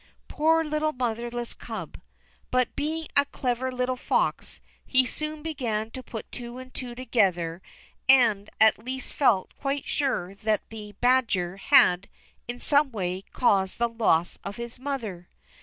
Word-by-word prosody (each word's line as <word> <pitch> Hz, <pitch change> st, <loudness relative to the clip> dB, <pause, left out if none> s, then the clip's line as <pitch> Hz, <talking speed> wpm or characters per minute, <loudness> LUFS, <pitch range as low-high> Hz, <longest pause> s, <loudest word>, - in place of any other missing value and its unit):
Poor 325 Hz, +1 st, +3 dB
little 305 Hz, 0 st, -1 dB
motherless 240 Hz, -1 st, -3 dB
Cub! -, -, -8 dB, 0.5 s
But, 255 Hz, -1 st, +1 dB
being 315 Hz, +2 st, -2 dB
a 285 Hz, -, +7 dB
clever 255 Hz, -2 st, -2 dB
little 250 Hz, 0 st, -1 dB
fox, -, -, 0 dB, 0.2 s
he 260 Hz, -1 st, +3 dB
soon 305 Hz, +3 st, -4 dB
began 230 Hz, -9 st, -2 dB
to 260 Hz, -, -6 dB
put 225 Hz, -3 st, -8 dB
two 240 Hz, 0 st, -7 dB
and 255 Hz, 0 st, -10 dB
two 245 Hz, -2 st, -5 dB
together, 190 Hz, -9 st, 0 dB, 0.5 s
and 225 Hz, -6 st, +5 dB
at 220 Hz, 0 st, +5 dB
last 260 Hz, +2 st, -4 dB
felt 215 Hz, -10 st, +2 dB
quite 275 Hz, 0 st, -2 dB
sure 255 Hz, -10 st, -1 dB
that 215 Hz, +1 st, -1 dB
the 210 Hz, -2 st, -8 dB
badger 225 Hz, -8 st, +2 dB
had, 185 Hz, -1 st, +4 dB, 0.4 s
in 240 Hz, +1 st, -5 dB
some 290 Hz, +1 st, +5 dB
way, 185 Hz, -4 st, -3 dB
caused 195 Hz, -6 st, +2 dB
the 235 Hz, -, +2 dB
loss 210 Hz, -8 st, +1 dB
of 200 Hz, -, -5 dB
his 235 Hz, +1 st, -7 dB
mother. 230 Hz, -11 st, -5 dB
240 Hz, 145 wpm, -26 LUFS, 210-265 Hz, 0.5 s, a